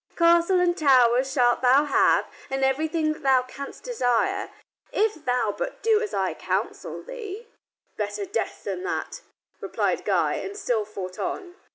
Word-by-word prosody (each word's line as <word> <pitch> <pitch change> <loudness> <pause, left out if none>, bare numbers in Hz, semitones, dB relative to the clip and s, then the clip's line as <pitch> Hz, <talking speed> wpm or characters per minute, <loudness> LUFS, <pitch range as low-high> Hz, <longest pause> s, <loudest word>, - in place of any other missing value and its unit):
Castle 340 +2 +4
and 350 -1 +2
tower 255 -5 +5
shalt 250 -3 +2
thou 260 +3 +5
have, 285 - +3 0.2
and 270 0 -1
everything 310 +3 +1
that 310 - -14
thou 265 -3 +4
canst 275 +2 -9
desire, 390 - 0 0.4
if 420 -7 0
thou 250 0 +1
but - - -5
do 440 -1 +4
as 425 -3 -3
I - - -1
counsel - - -3
thee." 465 -3 -7 0.5
"Better 405 - -3
death 395 +4 -3
than - - -4
that," 395 0 -4 0.4
replied - - -1
Guy, - - +1
and 400 +1 -6
still 235 - 0
fought 185 -3 -7
on. 365 -3 -4
315 Hz, 155 wpm, -25 LUFS, 255-395 Hz, 0.5 s, tower